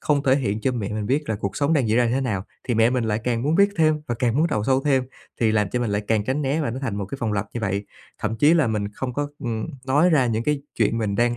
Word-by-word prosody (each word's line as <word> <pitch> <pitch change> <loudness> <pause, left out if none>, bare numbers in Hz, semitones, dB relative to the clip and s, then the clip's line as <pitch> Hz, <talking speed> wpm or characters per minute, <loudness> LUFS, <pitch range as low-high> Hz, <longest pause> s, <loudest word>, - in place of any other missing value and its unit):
không 145 -2 +1
thể 130 -1 +4
hiện 110 -6 -1
cho 130 +3 0
mẹ 110 -5 -3
mình 105 -1 -3
biết 145 +3 0
là 110 - 0
cuộc 100 -2 -4
sống 145 +2 +1
đang 135 -8 +2
diễn 110 - +2
ra 120 -1 +4
như 115 - 0
thế 135 - +1
nào 105 -8 -2 0.2
thì 125 - -1
mẹ 115 +1 +4
mình 125 -2 0
lại 110 0 0
càng 120 -2 0
muốn 150 +4 +1
biết 200 +3 +5
thêm 155 -2 +3
và 120 - 0
càng 120 -1 +1
muốn 160 - +4
đào 110 -10 -1
sâu 130 +2 +2
thêm, 135 -3 +2 0.4
thì 110 -2 +3
làm 105 -3 +1
cho 125 - -1
mình 120 -3 -1
lại 105 +1 0
càng 110 -2 +2
tránh 135 +6 -1
né 140 +3 0
và 145 - -1
nó 125 - -5
thành 115 -7 -2
một 100 - -2
cái 135 - -7
vòng 115 -3 -1
lặp 100 0 -1
như 120 - -3
vậy. 100 -1 -2 0.3
Thậm 110 +1 -2
chí 150 +8 +5
là 160 -6 +3
mình 105 -2 -1
không 125 +2 -5
có, 145 +1 -1
ừm, 115 -5 -3 0.2
nói 145 +7 +4
ra 140 -6 +4
những 115 0 -1
cái 150 -2 0
chuyện 115 0 +1
mình 105 -3 -1
đang 120 +1 +2
120 Hz, 320 wpm, -23 LUFS, 110-140 Hz, 0.4 s, biết